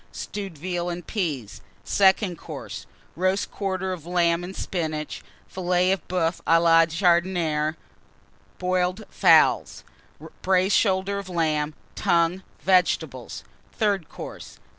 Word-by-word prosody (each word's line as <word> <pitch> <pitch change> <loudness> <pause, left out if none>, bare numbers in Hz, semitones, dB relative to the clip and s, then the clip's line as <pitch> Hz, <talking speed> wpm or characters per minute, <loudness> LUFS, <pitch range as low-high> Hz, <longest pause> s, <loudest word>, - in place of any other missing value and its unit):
Stewed 195 -6 -6
Veal 175 +2 -3
and 175 0 -5
Peas. 150 - -3 0.2
SECOND 190 -1 +3
COURSE. - - -8 0.3
Roast 185 +3 0
Quarter 190 -2 -2
of 175 -4 -8
Lamb 175 -1 +2
and 185 +2 -7
Spinach. 155 -4 -3 0.3
Filet 180 0 +1
de 195 - -15
Boeuf 175 -2 -1
à 165 0 +6
la 165 -1 +5
Jardinière. 170 -3 +1 0.8
Boiled 185 +3 -1
Fowls. - - +4 0.6
Braised 190 +1 +3
Shoulder 195 0 +1
of 195 -2 -8
Lamb. 155 -3 0 0.2
Tongue. 170 +2 +1 0.2
Vegetables. 160 -9 +1 0.3
THIRD 200 -7 0
COURSE. - - -9
180 Hz, 115 wpm, -24 LUFS, 165-190 Hz, 0.8 s, à